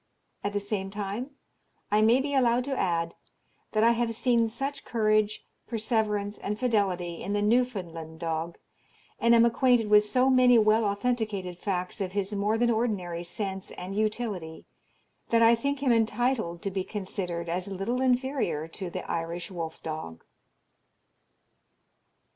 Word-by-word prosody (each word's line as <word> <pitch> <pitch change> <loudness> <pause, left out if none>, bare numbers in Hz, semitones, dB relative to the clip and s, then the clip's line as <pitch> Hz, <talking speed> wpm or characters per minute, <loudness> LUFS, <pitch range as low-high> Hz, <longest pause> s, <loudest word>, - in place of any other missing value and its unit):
At 205 - -2
the 205 - +1
same 200 -1 -3
time 205 +5 -4 0.6
I 210 +1 +4
may 230 +4 +5
be 285 +1 -3
allowed 250 -2 +3
to 275 +1 -2
add, 170 -5 0 0.6
that 215 0 +3
I 230 - +6
have 235 -1 0
seen 230 -1 +2
such 275 +5 -4
courage, 215 -2 +1 0.2
perseverance, 215 -3 -1
and 210 +1 -3
fidelity 195 -8 0
in 200 - -3
the 205 - +1
Newfoundland 185 -9 -1
dog, 165 0 -3 0.6
and 235 0 +5
am 230 0 +6
acquainted 235 -2 +3
with 210 0 +7
so 250 +5 +2
many 250 -1 +6
well 215 0 +4
authenticated 200 -4 -1
facts 185 +1 -3
of 185 -1 -3
his 200 0 -1
more 205 +2 +1
than 240 +1 +3
ordinary 200 -7 -1
sense 190 +1 -4
and 185 +2 -7
utility, 210 -6 -2 0.6
that 230 0 +4
I 230 +1 +7
think 280 +4 -1
him 260 - +3
entitled 225 -5 +1
to 195 - -2
be 190 0 -2
considered 185 -4 -4
as 180 +3 -2
little 200 +6 -2
inferior 255 - 0
to 180 +2 -6
the - - -6
Irish 170 +2 -3
wolf 165 -3 -6
dog. 155 - -6
210 Hz, 150 wpm, -28 LUFS, 185-235 Hz, 0.6 s, with